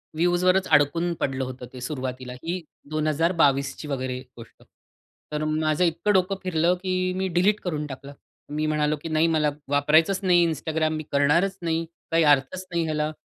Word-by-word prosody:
व्ह्यूजवरच 180 Hz, +3 st, +2 dB
अडकून 165 Hz, +4 st, +3 dB
पडलं 135 Hz, -1 st, -1 dB
होतं 130 Hz, 0 st, -7 dB
ते. 125 Hz, -, -9 dB
सुरुवातीला 130 Hz, -1 st, -5 dB
ही 175 Hz, +2 st, -3 dB, 0.3 s
2022ची 155 Hz, -2 st, +1 dB
वगैरे 130 Hz, -2 st, -3 dB, 0.2 s
गोष्ट. 115 Hz, -1 st, -14 dB, 0.7 s
तर 150 Hz, 0 st, -2 dB
माझं 155 Hz, +1 st, +1 dB
इतकं 175 Hz, +5 st, +1 dB
डोकं 190 Hz, +1 st, +2 dB
फिरलं 175 Hz, -1 st, +2 dB
की 185 Hz, -1 st, 0 dB
मी 190 Hz, 0 st, 0 dB
डिलीट 190 Hz, +4 st, +2 dB
करून 155 Hz, -4 st, -3 dB
टाकलं. 140 Hz, 0 st, -9 dB, 0.4 s
मी 155 Hz, +1 st, -1 dB
म्हणालो 150 Hz, 0 st, +1 dB
की 165 Hz, -, -6 dB
"नाही 155 Hz, +1 st, +2 dB
मला 155 Hz, -2 st, +2 dB, 0.2 s
वापरायचंच 150 Hz, +6 st, +3 dB
नाही, 175 Hz, -2 st, +4 dB
Instagram 155 Hz, 0 st, -1 dB
मी 155 Hz, -, -5 dB
करणारच 165 Hz, +8 st, +2 dB
नाही. 165 Hz, -1 st, -1 dB, 0.3 s
काही 165 Hz, 0 st, +4 dB
अर्थच 145 Hz, +7 st, +1 dB
नाही 170 Hz, -1 st, 0 dB
ह्याला. 155 Hz, -1 st, -1 dB
155 Hz, 160 wpm, -25 LUFS, 145-175 Hz, 0.7 s, नाही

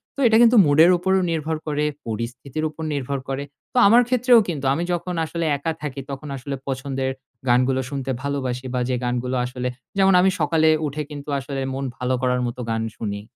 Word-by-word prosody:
তো -, -, -9 dB
এটা 220 Hz, -1 st, +5 dB
কিন্তু 240 Hz, 0 st, +6 dB
মুডের 155 Hz, +4 st, +6 dB
উপরও 190 Hz, +2 st, +1 dB
নির্ভর 160 Hz, 0 st, -1 dB
করে, 150 Hz, 0 st, 0 dB, 0.2 s
পরিস্থিতির 120 Hz, +6 st, -4 dB
উপর 160 Hz, +1 st, -9 dB
নির্ভর 140 Hz, 0 st, -2 dB
করে। 135 Hz, +1 st, -2 dB, 0.3 s
তো -, -, -2 dB
আমার 235 Hz, +4 st, +7 dB
ক্ষেত্রেও 250 Hz, -1 st, +5 dB
কিন্তু 150 Hz, -6 st, -3 dB
আমি 165 Hz, +5 st, -1 dB
যখন 175 Hz, +1 st, -3 dB
আসলে 170 Hz, +1 st, -3 dB
একা 150 Hz, +4 st, -2 dB
থাকি, 140 Hz, -2 st, -5 dB
তখন 140 Hz, +2 st, -6 dB
আসলে 140 Hz, +2 st, -5 dB
পছন্দের 135 Hz, 0 st, -2 dB, 0.4 s
গানগুলো 130 Hz, +2 st, +3 dB
শুনতে 135 Hz, -2 st, -3 dB
ভালোবাসি 130 Hz, -3 st, -3 dB
বা, 125 Hz, -, 0 dB
যে 130 Hz, -, +1 dB
গানগুলো 125 Hz, +1 st, -1 dB
আসলে 125 Hz, 0 st, -4 dB, 0.3 s
যেমন 195 Hz, 0 st, +5 dB
আমি 190 Hz, -, +4 dB
সকালে 160 Hz, +1 st, +3 dB, 0.2 s
উঠে 150 Hz, +2 st, -4 dB
কিন্তু 145 Hz, 0 st, -8 dB
আসলে 135 Hz, +1 st, -5 dB
মন 135 Hz, +1 st, -3 dB
ভালো 125 Hz, 0 st, -1 dB
করার 125 Hz, -1 st, +1 dB
মতো 120 Hz, +1 st, -6 dB
গান 115 Hz, 0 st, 0 dB, 0.2 s
শুনি। 100 Hz, -2 st, -4 dB
140 Hz, 190 wpm, -22 LUFS, 130-160 Hz, 0.4 s, আমার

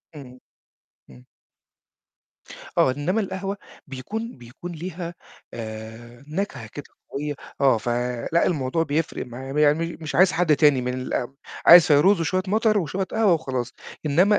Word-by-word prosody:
إمم. 130 Hz, -3 st, -11 dB, 0.7 s
إمم. 65 Hz, -1 st, -16 dB, 1.5 s
آه، 130 Hz, -, +5 dB
إنّما 150 Hz, +11 st, -1 dB
القهوة 195 Hz, 0 st, -3 dB, 0.3 s
بيكون 205 Hz, -, -6 dB
بيكون 125 Hz, +9 st, -9 dB
ليها 170 Hz, +1 st, -6 dB, 0.4 s
آآ، 115 Hz, +2 st, -9 dB
نَكهة 155 Hz, -, -4 dB
كده 145 Hz, +6 st, -9 dB, 0.3 s
قوية 145 Hz, +1 st, -3 dB, 0.3 s
آه، 130 Hz, -5 st, +4 dB
ف 115 Hz, -, -6 dB, 0.4 s
لأ، 170 Hz, -, +3 dB
الموضوع 155 Hz, -1 st, 0 dB
بيفرق 155 Hz, -2 st, -2 dB
مع 135 Hz, +4 st, -6 dB
يعني 155 Hz, +3 st, +2 dB
مش 155 Hz, -2 st, -6 dB
عايز 185 Hz, +1 st, +5 dB
حد 165 Hz, -4 st, +3 dB
تاني 145 Hz, -4 st, +4 dB
من 125 Hz, 0 st, -2 dB
الأم 130 Hz, +1 st, -3 dB, 0.3 s
عايز 170 Hz, -1 st, +10 dB
فيروز 165 Hz, +5 st, +5 dB
وشوية 185 Hz, +4 st, 0 dB
مطر 215 Hz, +1 st, +2 dB
وشوية 190 Hz, +2 st, -2 dB
قهوة 210 Hz, -1 st, +2 dB
وخلاص، 130 Hz, -6 st, -3 dB, 0.3 s
إنّما 185 Hz, +8 st, +4 dB
150 Hz, 140 wpm, -24 LUFS, 130-180 Hz, 1.5 s, عايز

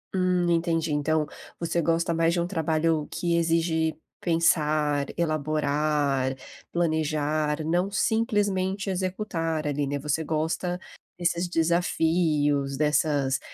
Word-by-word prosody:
Hum, 180 Hz, -1 st, +2 dB
entendi, 165 Hz, -2 st, +1 dB
então 150 Hz, +1 st, +1 dB, 0.3 s
você 170 Hz, 0 st, 0 dB
gosta 165 Hz, +1 st, +1 dB
mais 165 Hz, 0 st, +2 dB
de 175 Hz, -, 0 dB
um 170 Hz, -, 0 dB
trabalho 160 Hz, -3 st, 0 dB
que 170 Hz, -1 st, 0 dB
exige 165 Hz, -1 st, +1 dB, 0.3 s
pensar, 155 Hz, -3 st, +2 dB
elaborar, 150 Hz, -3 st, 0 dB, 0.4 s
planejar, 155 Hz, -2 st, 0 dB
não 175 Hz, +5 st, +1 dB
simplesmente 205 Hz, -3 st, 0 dB
executar 180 Hz, -5 st, -2 dB
ali, 145 Hz, 0 st, 0 dB
né, 140 Hz, +1 st, -2 dB
você 150 Hz, +3 st, -1 dB
gosta 160 Hz, +3 st, -1 dB, 0.4 s
desses 175 Hz, 0 st, 0 dB
desafios, 160 Hz, -4 st, +1 dB
dessas 145 Hz, -2 st, +1 dB
160 Hz, 105 wpm, -26 LUFS, 150-175 Hz, 0.4 s, Hum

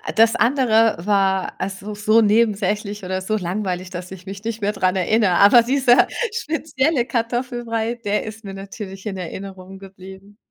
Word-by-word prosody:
das 225 Hz, +1 st, +4 dB
andere 230 Hz, -3 st, +3 dB
war, 195 Hz, -2 st, +1 dB
also, 195 Hz, +2 st, -5 dB
so 215 Hz, +2 st, +3 dB
nebensächlich 210 Hz, -1 st, +1 dB
oder 185 Hz, +1 st, -3 dB
so 215 Hz, +3 st, -1 dB
langweilig, 185 Hz, -1 st, -3 dB
dass 180 Hz, 0 st, -8 dB
ich 185 Hz, -1 st, -10 dB
mich 195 Hz, +1 st, -8 dB
nicht 225 Hz, -1 st, -4 dB
mehr 205 Hz, -, +1 dB
daran 185 Hz, -1 st, 0 dB
erinnere. 195 Hz, +1 st, +2 dB
Aber 205 Hz, +6 st, +6 dB
dieser 255 Hz, 0 st, +4 dB, 0.2 s
spezielle 310 Hz, -, -1 dB
Kartoffelbrei, 240 Hz, -1 st, -2 dB
der 210 Hz, -3 st, -2 dB
ist 220 Hz, 0 st, -9 dB
mir 195 Hz, -, -7 dB
natürlich 195 Hz, 0 st, -9 dB
in 195 Hz, -3 st, -4 dB
Erinnerung 190 Hz, +1 st, -8 dB
geblieben. 195 Hz, +1 st, -13 dB
205 Hz, 155 wpm, -21 LUFS, 190-230 Hz, 0.2 s, Aber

